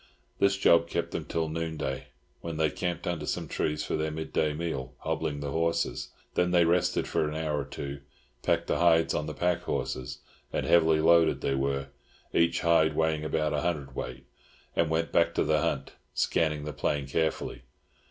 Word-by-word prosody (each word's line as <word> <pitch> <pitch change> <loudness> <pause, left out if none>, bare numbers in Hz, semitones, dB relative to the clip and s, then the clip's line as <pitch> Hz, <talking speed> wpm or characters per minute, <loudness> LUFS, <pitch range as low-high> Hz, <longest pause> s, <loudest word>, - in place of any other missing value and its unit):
This 100 0 +3
job 85 -3 +5
kept 85 0 -2
them - - -3
till 80 -1 -1
noonday, 80 0 -3 0.3
when 85 -2 -5
they 80 -1 +2
camped 90 -2 -3
under 85 -3 -2
some - - -2
trees 75 0 -1
for - - -1
their 80 0 0
midday 80 0 -1
meal, 75 -5 -4
hobbling 70 -1 -2
the 70 -1 -3
horses. 85 +2 0 0.2
Then 90 0 +2
they 90 -1 +4
rested 85 +2 +2
for 75 - 0
an 75 - -5
hour 80 -2 -1
or 70 - -3
two, 70 0 -6 0.4
packed - - +1
the - - 0
hides 80 -1 +4
on 75 - -1
the 75 - -5
pack 90 +1 +1
horses 65 -1 -3 0.3
(and - - -1
heavily 80 -2 +4
loaded 85 0 +5
they 70 - 0
were, 70 0 -1 0.4
each 85 0 +3
hide 85 -2 +4
weighing 80 -1 +1
about 75 0 0
a 75 - 0
hundredweight), 70 -5 -3 0.5
and 85 - +2
went 80 +1 0
back 85 0 +3
to - - +3
the 75 -1 +2
hunt, - - -1 0.2
scanning 75 -2 +1
the 75 0 -5
plain 70 +1 -1
carefully. 80 -2 -1
80 Hz, 180 wpm, -29 LUFS, 75-85 Hz, 0.5 s, job